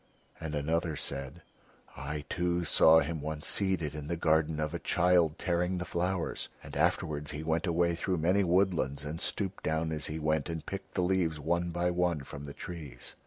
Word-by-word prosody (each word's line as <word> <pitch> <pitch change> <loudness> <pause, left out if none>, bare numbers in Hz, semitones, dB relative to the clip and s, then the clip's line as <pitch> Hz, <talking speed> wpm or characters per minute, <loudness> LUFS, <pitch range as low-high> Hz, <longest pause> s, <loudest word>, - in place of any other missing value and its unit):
And 80 -1 -4
another 80 +2 0
said: 70 +4 -4 0.5
"I 75 +2 -5
too 85 +2 0
saw 80 +1 +6
him 80 +1 -3
once 75 0 -3
seated 95 -7 +1
in 75 -1 -6
the 85 - -1
garden 80 -1 +2
of 75 0 -1
a - - -2
child 85 -3 +3
tearing 90 +1 0
the 90 - -3
flowers, 90 0 -2
and - - -9
afterwards 75 -1 0
he 75 +1 -4
went 80 +2 0
away 85 0 +2
through 90 +2 -1
many 90 +5 +3
woodlands 85 -6 +1
and 80 +3 -4
stooped 95 -2 -2
down 80 +1 0
as 75 -1 -2
he 75 - -4
went, 80 +1 0
and 80 -2 -4
picked 95 0 -7
the 90 - +2
leaves 90 -4 +1
one 85 +3 0
by 85 +1 0
one 90 -3 +1
from 70 +1 -8
the 70 - -7
trees." 75 -9 -7
80 Hz, 190 wpm, -31 LUFS, 75-90 Hz, 0.5 s, saw